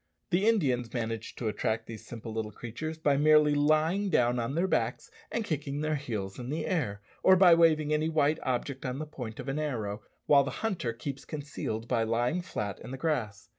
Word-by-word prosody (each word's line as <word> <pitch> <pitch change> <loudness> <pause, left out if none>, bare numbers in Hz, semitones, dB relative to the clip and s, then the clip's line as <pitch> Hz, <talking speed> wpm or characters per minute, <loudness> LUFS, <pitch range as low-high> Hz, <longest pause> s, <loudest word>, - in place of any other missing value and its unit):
The 190 +4 +3
Indians 130 - +2
manage 115 -1 -3
to 115 - -3
attract 110 +1 -1
these 115 -2 -9
simple 115 -1 -7
little 110 -1 -3
creatures 120 +9 -6
by 145 -3 +2
merely 150 0 +5
lying 155 +7 +2
down 125 -6 +2
on 120 +4 -2
their 170 +3 +2
backs - - -1 0.2
and 230 - -1
kicking 145 -3 -2
their 155 0 0
heels 110 -9 -4
in 125 0 -6
the 155 +2 -2
air, 105 - -1 0.2
or 190 - +7
by 180 -2 +7
waving 155 -2 +4
any 155 +1 +1
white 155 0 +2
object 130 +1 -2
on 125 0 -3
the 155 - -4
point 125 -7 -7
of - - -6
an 135 +2 -1
arrow, 110 -9 -3 0.2
while 140 -1 +6
the 135 - -3 0.2
hunter 175 - -1
keeps 135 +4 -6
concealed 140 -7 -5
by 120 -2 +1
lying 120 +9 +1
flat 105 - -4
in - - -9
the 135 - -5
grass. 120 -9 -2
140 Hz, 205 wpm, -29 LUFS, 115-155 Hz, 0.2 s, or